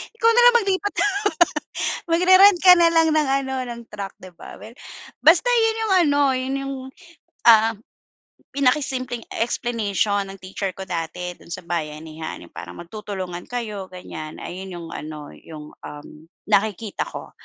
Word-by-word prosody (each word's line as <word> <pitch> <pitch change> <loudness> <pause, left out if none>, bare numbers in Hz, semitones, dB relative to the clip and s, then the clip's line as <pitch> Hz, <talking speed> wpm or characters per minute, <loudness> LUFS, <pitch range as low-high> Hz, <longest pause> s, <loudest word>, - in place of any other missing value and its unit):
ikaw 460 0 +3
na 485 - +6
lang 485 0 +7
maglipat. 395 0 -1 1.2
Magre-rent 370 +2 +6
ka 365 0 +9
na 340 -1 +5
lang 325 -1 +4
ng 300 -3 +2
ano, 265 0 -4
ng 235 -1 -7
truck, 200 -2 -6
di 185 - -11
ba. - - -12
Well, 225 +3 -12 0.5
basta 335 +9 +6
'yon 450 -2 +3
yung 385 - +2
ano, 285 0 +2
'yon 260 +1 -2
yung, 275 0 -4 0.7
uhm, 225 0 +6 0.8
pinakasimpleng 255 -3 0 0.2
explanation 210 -4 0
ng 195 - -9
teacher 190 +1 -4
ko 190 - -5
dati 175 +1 -4
do'n - - -17
sa 170 - -6
bayanihan 160 - -5
yung 85 - -16
parang 90 0 -9
magtutulungan 185 -2 -7
kayo 215 -6 -5
ganyan 160 -4 -9
ayun 185 +1 -7
yung 165 -1 -8
ano, 150 -1 -8
yung, 155 -2 -11
uhm, 150 +2 -11 0.2
nakikita 210 0 0
ko, - - -9
215 Hz, 150 wpm, -22 LUFS, 175-285 Hz, 1.2 s, ka